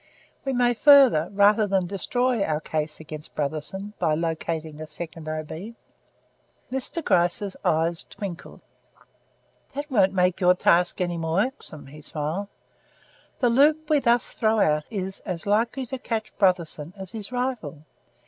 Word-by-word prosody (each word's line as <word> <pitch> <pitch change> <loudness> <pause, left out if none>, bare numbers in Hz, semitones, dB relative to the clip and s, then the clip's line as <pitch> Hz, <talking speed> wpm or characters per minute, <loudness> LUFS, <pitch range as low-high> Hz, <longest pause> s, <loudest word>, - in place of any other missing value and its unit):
We 270 - 0
may 245 -1 +3
further, 255 - +6
rather 205 +2 +4
than 190 -2 +1
destroy, 240 +6 0
our 155 -3 0
case 155 -1 -3
against 155 -1 -9
Brotherson 155 +8 -4
by 160 -3 +2
locating 160 -1 -3
a 155 - -6
second 160 -1 -7
O.B." 160 +8 -6 1.0
Mr. 265 +5 -1
Gryce's 175 +3 +1
eyes 165 +2 +1
twinkled. 190 -5 -8 1.1
"That 290 +1 -5
won't 195 -6 +4
make 180 0 +1
your 180 0 +5
task 175 0 +2
any 175 -1 -1
more 165 +3 +1
irksome," 255 - -5
he 150 +3 -12
smiled. 155 +7 -3 0.9
"The 245 -2 +4
loop 300 +5 +3
we 300 - +5
thus 240 -2 +2
throw 220 -1 +1
out 150 -4 +2
is 190 -3 -4
as 180 -3 -5
likely 230 +6 +1
to 260 +2 -6
catch 225 -3 -4
Brotherson 170 -4 +1
as 190 -2 -8
his 215 0 -6
rival. 245 - -3
190 Hz, 145 wpm, -25 LUFS, 160-235 Hz, 1.1 s, further